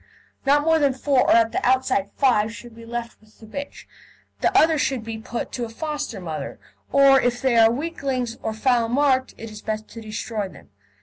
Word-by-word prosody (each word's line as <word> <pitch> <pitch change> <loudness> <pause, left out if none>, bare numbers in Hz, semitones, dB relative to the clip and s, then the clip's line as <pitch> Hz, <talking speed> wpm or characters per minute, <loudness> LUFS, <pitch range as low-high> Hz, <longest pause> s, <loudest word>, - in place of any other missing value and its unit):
Not 290 +1 +4
more 320 +1 +3
than 280 -3 +2
four, 265 -1 +2
or - - +6
at 230 -1 +4
the - - -2
outside 255 -6 +2
five, 225 -6 +3
should 235 +1 -11
be 230 0 -13
left 235 -1 -6
with 215 0 -24
the 220 - -13
bitch; 280 +6 -8 0.5
the - - +2
others 315 -2 +4
should 260 -4 -1
be 225 0 -6
put 235 +2 -5
to 245 - -4
a - - -9
foster 295 +1 -4
mother, 160 -4 -6 0.3
or 275 -1 +6
if 245 0 0
they 260 -2 +1
are 225 -1 +7
weaklings 265 -3 -3
or 220 - -2
foul 230 +1 +1
marked, 260 0 +1
it 225 -1 -8
is 210 -1 -10
best 215 0 -4
to 230 - -10
destroy 215 -1 -4
them. 140 - -17
240 Hz, 205 wpm, -23 LUFS, 220-275 Hz, 0.5 s, are